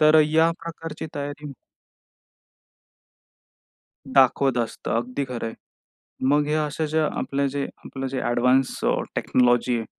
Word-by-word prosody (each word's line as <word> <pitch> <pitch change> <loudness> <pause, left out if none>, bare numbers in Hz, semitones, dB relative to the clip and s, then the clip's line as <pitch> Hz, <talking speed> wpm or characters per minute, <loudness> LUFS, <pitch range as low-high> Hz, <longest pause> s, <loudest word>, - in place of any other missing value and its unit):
तर 155 0 +7
या 160 +2 +4
प्रकारची 165 -1 -6
तयारी. 145 0 -5 2.6
दाखवत 135 -1 +4
असतं. 115 -1 -3
अगदी 125 +4 -2
खरंय. 115 -2 -4 0.8
मग 145 +1 +3
ह्या 155 0 +1
अशा 150 +2 -2
जे 160 - +2
आपलं 140 -2 0
जे 140 +1 -2 0.2
आपलं 135 0 -5
जे 130 0 -3
ॲडव्हान्स्ड 125 +2 +2 0.3
टेक्नॉलॉजी 120 0 +2
आहे. 115 - -4
140 Hz, 115 wpm, -24 LUFS, 125-150 Hz, 2.6 s, तर